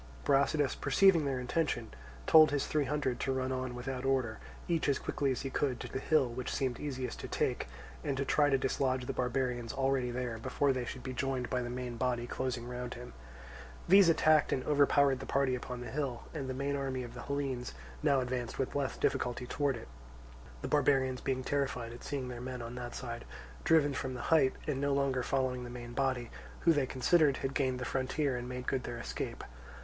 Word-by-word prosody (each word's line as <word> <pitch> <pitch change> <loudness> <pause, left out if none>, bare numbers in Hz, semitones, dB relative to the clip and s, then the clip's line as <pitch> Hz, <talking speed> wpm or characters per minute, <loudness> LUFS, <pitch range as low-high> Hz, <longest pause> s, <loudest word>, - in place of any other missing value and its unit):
Brasidas, 140 - +3
perceiving 190 -6 +4
their 135 -2 0
intention, 125 -3 -1 0.3
told 155 -1 +8
his 145 -1 0
three 150 -2 +1
hundred 135 -3 -1
to 135 - 0
run 130 0 -1
on 130 -1 -3
without 125 +1 -4
order, 130 -5 0 0.3
each 165 -4 +1
as 140 - +3
quickly 140 -2 -1
as 130 - -2
he 135 - -3
could, 130 -4 0
to - - -5
the - - -4
hill 150 -1 +3
which 120 +1 -4
seemed 130 -3 -1
easiest 130 -4 -4
to - - -5
take, - - -1 0.4
and 140 -2 -1
to 140 - 0
try 145 +1 +3
to 135 - +4
dislodge 130 -1 0
the - - -2
barbarians 125 -2 -1
already 135 -2 +1
there, 120 -2 -3
before 140 +4 +1
they 125 -1 -2
should 125 +1 -6
be 130 - -4
joined 130 -1 -2
by 125 -1 +1
the 120 - -4
main 125 -1 -4
body 120 0 0
closing 120 -1 -3
round 125 0 -5
him. 120 +1 -9 0.7
These 195 -1 +8
attacked 155 -2 +4
and 130 - 0
overpowered 140 -2 +4
the - - -7
party 135 -1 +2
upon 125 0 -4
the 125 - -6
hill, 135 -4 -2
and 140 -5 -4
the 130 - -3
main 140 +1 -1
army 135 -2 -2
of 120 -1 -8
the 125 - -7
Hellenes 135 - -3 0.3
now 140 -3 +3
advanced 125 -2 -3
with 135 - -1
less 140 -2 -1
difficulty 125 0 0
towards 140 0 0
it—the 60 - -12
barbarians 135 -3 +2
being 130 -1 -1
terrified 125 -4 -1
at 120 - -11
seeing 135 -3 -3
their 120 -1 -6
men 125 -1 -5
on 115 +1 -6
that 120 -1 -6
side 120 -2 -5 0.4
driven 150 -3 +4
from 130 -1 -3
the 125 - -5
height 140 -5 +5
and 140 -3 -1
no 140 -1 +2
longer 135 -2 +1
following 130 0 0
the 120 - -7
main 120 0 -7
body, 130 -2 -1 0.3
who, 165 - +5
they 145 -4 +1
considered, 140 +2 +3
had 135 - -1
gained 130 -3 +1
the 125 - -4
frontier 135 +1 0
and 125 0 -4
made 125 0 -5
good 130 -2 -1
their 120 - -5
escape. 115 - -5
130 Hz, 210 wpm, -32 LUFS, 125-140 Hz, 0.7 s, told